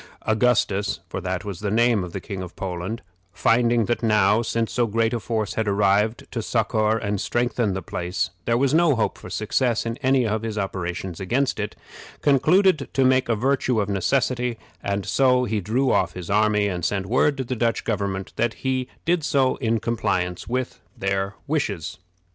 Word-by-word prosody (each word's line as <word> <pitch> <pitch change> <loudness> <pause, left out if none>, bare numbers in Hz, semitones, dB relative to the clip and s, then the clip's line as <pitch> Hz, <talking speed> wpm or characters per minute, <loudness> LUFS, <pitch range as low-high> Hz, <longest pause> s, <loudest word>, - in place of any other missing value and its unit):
Augustus, 110 -3 +1
for 95 - -5
that 90 +2 -3
was 100 -4 -5
the 105 - -2
name 115 -1 +3
of 90 - -7
the 95 - -4
King 95 0 -6
of 90 -1 -8
Poland, 95 +4 -4 0.3
finding 115 +1 +2
that 120 - -1
now, 105 -1 +3
since 115 0 -1
so 120 -2 +2
great 115 +2 +1
a 120 - 0
force 110 0 -2
had 110 -1 -1
arrived 100 +2 +2
to 115 - -2
succor 110 -1 +1
and 105 -3 -2
strengthen 120 -4 0
the 95 - -4
place, 90 +3 -2
there 115 0 +2
was 135 +2 +2
no 165 -3 +4
hope 115 - 0
for - - -11
success 115 +5 0
in 115 +1 -3
any 130 -1 +2
of 110 0 -1
his 110 -1 -4
operations 90 -3 -3
against 125 +7 0
it, 105 +1 -3 0.5
concluded 155 +3 +3
to 135 - +3
make 130 -1 +3
a 115 - +3
virtue 130 0 +1
of 105 -1 -1
necessity, 125 +4 0 0.2
and 100 -1 -2
so 125 -2 +3
he 110 -3 -1
drew 125 +7 +1
off - - +1
his 90 0 -6
army, 105 0 +3
and 90 -3 -3
sent 95 +2 0
word 130 +7 +2
to 135 - -1
the 130 +1 -3
Dutch 115 0 0
government 100 -3 -2
that 120 -1 0
he 130 -1 -2 0.2
did 170 -1 +2
so 135 -4 +2
in 115 -3 0
compliance 95 -6 -1
with 125 +1 -3 0.2
their 95 +1 -1
wishes. 110 - -2
110 Hz, 190 wpm, -23 LUFS, 100-125 Hz, 0.5 s, no